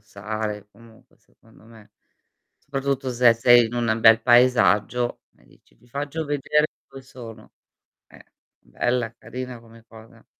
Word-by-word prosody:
stare 105 Hz, 0 st, -6 dB
comunque 115 Hz, +1 st, -21 dB
secondo 115 Hz, -1 st, -25 dB
me. 110 Hz, -2 st, -18 dB, 0.7 s
Soprattutto 135 Hz, -1 st, -3 dB
se 120 Hz, -1 st, +4 dB
sei 120 Hz, 0 st, +5 dB
in 115 Hz, -, -8 dB
un 120 Hz, -1 st, -2 dB
an 110 Hz, -, 0 dB
bel 115 Hz, 0 st, +6 dB
paesaggio 120 Hz, -1 st, +2 dB, 0.2 s
e -, -, -26 dB
dici: -, -, -27 dB
"ti -, -, -26 dB
faccio 145 Hz, +5 st, -5 dB
vedere 145 Hz, +1 st, 0 dB, 0.2 s
dove 135 Hz, -, -12 dB
sono." 115 Hz, -4 st, -13 dB, 0.6 s
Eh. -, -, -18 dB, 0.4 s
Bella, 120 Hz, -, -2 dB
carina 125 Hz, +1 st, -8 dB
come 115 Hz, 0 st, -19 dB
cosa. 110 Hz, 0 st, -17 dB
120 Hz, 140 wpm, -23 LUFS, 110-130 Hz, 0.7 s, bel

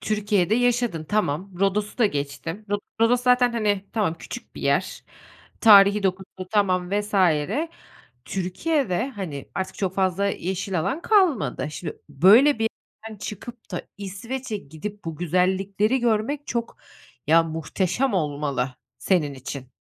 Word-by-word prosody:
Türkiye'de 210 Hz, -2 st, +1 dB
yaşadın, 240 Hz, -8 st, +1 dB
tamam. 190 Hz, 0 st, -1 dB
Rodos'u 205 Hz, +3 st, 0 dB
da 225 Hz, -, +5 dB
geçtim. 165 Hz, +6 st, -4 dB, 0.3 s
Rodos 245 Hz, +2 st, +4 dB
zaten, 250 Hz, -1 st, +4 dB
hani, 205 Hz, -4 st, 0 dB
tamam, 205 Hz, -8 st, 0 dB
küçük -, -, -9 dB
bir -, -, -8 dB
yer. -, -, 0 dB, 0.6 s
Tarihî 205 Hz, -2 st, +7 dB
dokusu 190 Hz, 0 st, -3 dB
tamam 185 Hz, -4 st, +1 dB
vs. 205 Hz, +1 st, -2 dB, 1.1 s
Türkiye'de, 205 Hz, -, -1 dB
hani, 180 Hz, -, -6 dB
artık 190 Hz, -, -3 dB
çok 190 Hz, -2 st, -2 dB
fazla 190 Hz, 0 st, +1 dB
yeşil 190 Hz, -1 st, -2 dB
alan 270 Hz, -, -2 dB
kalmadı. 325 Hz, -, +2 dB
Şimdi, 170 Hz, -, -6 dB
böyle 220 Hz, -, +6 dB
bir 225 Hz, 0 st, +1 dB, 0.4 s
yerden 215 Hz, -, -10 dB
çıkıp 215 Hz, +3 st, -8 dB
da 180 Hz, -, -3 dB, 0.2 s
İsveç'e 215 Hz, +4 st, -5 dB
gidip 195 Hz, +6 st, -8 dB
bu 165 Hz, -, -4 dB
güzellikleri 190 Hz, -, +1 dB
görmek 240 Hz, +5 st, 0 dB
çok 235 Hz, -1 st, -3 dB, 0.5 s
ya, 165 Hz, +2 st, +6 dB
muhteşem 180 Hz, -, -1 dB
olmalı 145 Hz, -6 st, -1 dB, 0.2 s
senin 155 Hz, -7 st, +1 dB
için. 130 Hz, 0 st, -8 dB
200 Hz, 125 wpm, -24 LUFS, 175-225 Hz, 1.1 s, Tarihî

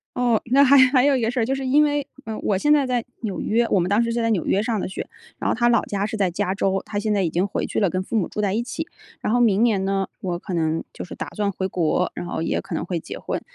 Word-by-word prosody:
哦， 240 Hz, -3 st, +2 dB
那 275 Hz, +2 st, +6 dB
还 280 Hz, +1 st, +6 dB
还 255 Hz, -1 st, +3 dB
有 285 Hz, -1 st, +4 dB
一 255 Hz, -, 0 dB
个 225 Hz, -, +1 dB
事 250 Hz, -, -2 dB
儿。 225 Hz, -, +2 dB
就 260 Hz, -, 0 dB
是 270 Hz, 0 st, -4 dB
因 285 Hz, +4 st, +4 dB
为 290 Hz, -1 st, 0 dB, 0.4 s
我 200 Hz, -, +1 dB
现 295 Hz, +10 st, +3 dB
在 290 Hz, -2 st, +3 dB
在 250 Hz, -2 st, 0 dB, 0.2 s
纽 215 Hz, -5 st, -3 dB
约， 235 Hz, +2 st, +1 dB
我 195 Hz, -, +3 dB
们 175 Hz, -, 0 dB
当 205 Hz, +3 st, +3 dB
时 230 Hz, -, -1 dB
是 235 Hz, 0 st, -1 dB
在 230 Hz, -, +1 dB
纽 200 Hz, -6 st, 0 dB
约 195 Hz, -, +2 dB
上 220 Hz, -1 st, -1 dB
的 -, -, -2 dB
学， 190 Hz, -, -6 dB, 0.3 s
然 -, -, -1 dB
后 -, -, +1 dB
他 240 Hz, +1 st, +3 dB
老 235 Hz, -2 st, +3 dB
家 200 Hz, 0 st, -2 dB
是 220 Hz, +1 st, -4 dB
在 195 Hz, -3 st, +1 dB
加 190 Hz, +1 st, -1 dB
州， 195 Hz, -1 st, 0 dB
他 205 Hz, -, -3 dB
现 215 Hz, 0 st, 0 dB
在 200 Hz, -2 st, +1 dB
已 170 Hz, -, +1 dB
经 175 Hz, +4 st, 0 dB
回 -, -, -2 dB
去 -, -, -2 dB
了 200 Hz, -, +2 dB
跟 185 Hz, +2 st, -1 dB
父 230 Hz, -, -5 dB
母 205 Hz, -5 st, +1 dB
住 210 Hz, -, -4 dB
在 200 Hz, -2 st, 0 dB
一 225 Hz, -, 0 dB
起。 320 Hz, +7 st, -5 dB, 0.3 s
然 215 Hz, -, 0 dB
后 245 Hz, -, +3 dB
明 220 Hz, -3 st, +4 dB
年 210 Hz, -5 st, +2 dB
呢， 195 Hz, -1 st, 0 dB
我 175 Hz, -2 st, -3 dB
可 185 Hz, -, -6 dB
能 160 Hz, -1 st, 0 dB
就 -, -, -7 dB
是 -, -, -9 dB
打 -, -, -5 dB
算 205 Hz, -2 st, 0 dB
回 190 Hz, 0 st, -3 dB
国， 180 Hz, 0 st, 0 dB
然 -, -, -5 dB
后 175 Hz, -, -3 dB
也 -, -, 0 dB
可 195 Hz, -, -7 dB
能 -, -, -2 dB
会 175 Hz, -2 st, -2 dB
结 -, -, -8 dB
婚。 -, -, -3 dB
210 Hz, 335 characters per minute, -23 LUFS, 190-240 Hz, 0.4 s, 那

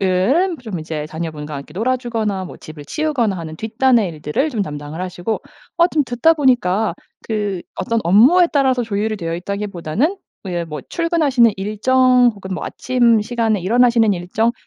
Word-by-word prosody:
은 245 Hz, -, +2 dB
좀 205 Hz, -7 st, -5 dB
이제 155 Hz, -1 st, -5 dB
자녀분과 155 Hz, -2 st, -6 dB
함께 140 Hz, +2 st, -9 dB
놀아주거나 225 Hz, -4 st, -1 dB
뭐 -, -, -9 dB
집을 155 Hz, -2 st, -11 dB
치우거나 250 Hz, -, -1 dB
하는 160 Hz, -2 st, -7 dB
뒷단의 225 Hz, 0 st, +2 dB
일들을 155 Hz, -, -2 dB
좀 220 Hz, -7 st, -1 dB
담당을 150 Hz, 0 st, -6 dB
하시고. 185 Hz, +3 st, -3 dB, 0.4 s
어 340 Hz, 0 st, +5 dB
좀 305 Hz, -4 st, +1 dB
듣다 250 Hz, +7 st, +3 dB
보니까 225 Hz, -, +2 dB, 0.3 s
그 205 Hz, -5 st, -2 dB
어떤 230 Hz, +4 st, -1 dB
업무에 255 Hz, -, +6 dB
따라서 265 Hz, -3 st, +2 dB
조율이 215 Hz, 0 st, -2 dB
되어있다기보다는 195 Hz, -, -2 dB, 0.3 s
뭐 190 Hz, -, -5 dB
예를 170 Hz, -1 st, -2 dB
뭐 150 Hz, -3 st, -6 dB
출근하시는 305 Hz, -9 st, +2 dB
일정 250 Hz, +5 st, +3 dB
혹은 190 Hz, -2 st, -7 dB
뭐 -, -, -5 dB
아침 240 Hz, -3 st, +2 dB
시간에 225 Hz, -3 st, 0 dB
일어나시는 230 Hz, +1 st, +3 dB
일정 190 Hz, +6 st, 0 dB
215 Hz, 370 characters per minute, -19 LUFS, 180-250 Hz, 0.4 s, 업무에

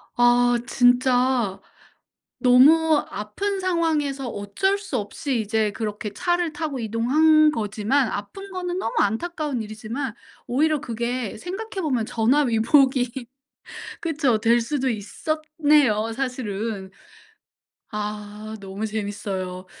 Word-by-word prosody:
아 245 Hz, 0 st, +4 dB
진짜 245 Hz, -4 st, +3 dB, 0.8 s
너무 300 Hz, +5 st, +6 dB
아픈 385 Hz, -, -3 dB
상황에서 315 Hz, -7 st, 0 dB
어쩔 225 Hz, -, -1 dB
수 395 Hz, -10 st, -4 dB
없이 235 Hz, +5 st, -2 dB
이제 215 Hz, 0 st, 0 dB
그렇게 210 Hz, 0 st, -4 dB
차를 350 Hz, -, 0 dB
타고 300 Hz, -3 st, -3 dB
이동한 300 Hz, +8 st, +4 dB
거지만 220 Hz, +2 st, 0 dB
아픈 390 Hz, -, -6 dB
거는 360 Hz, -1 st, -3 dB
너무 230 Hz, -11 st, -2 dB
안타까운 290 Hz, -, -1 dB
일이지만 220 Hz, +4 st, -5 dB, 0.3 s
오히려 300 Hz, +5 st, +1 dB
그게 235 Hz, -3 st, -3 dB
생각해 385 Hz, -, -5 dB
보면 255 Hz, -9 st, 0 dB
전화위복이 250 Hz, +1 st, +2 dB, 0.7 s
그쵸. 295 Hz, -8 st, +1 dB
될 230 Hz, +2 st, +3 dB
수도 265 Hz, +2 st, -1 dB
있었네요 290 Hz, 0 st, +1 dB
사실은. 225 Hz, -6 st, -4 dB, 1.0 s
아 210 Hz, +1 st, -5 dB
너무 195 Hz, +2 st, -5 dB
재밌어요. 200 Hz, -3 st, -4 dB
245 Hz, 240 characters per minute, -23 LUFS, 215-300 Hz, 1.0 s, 너무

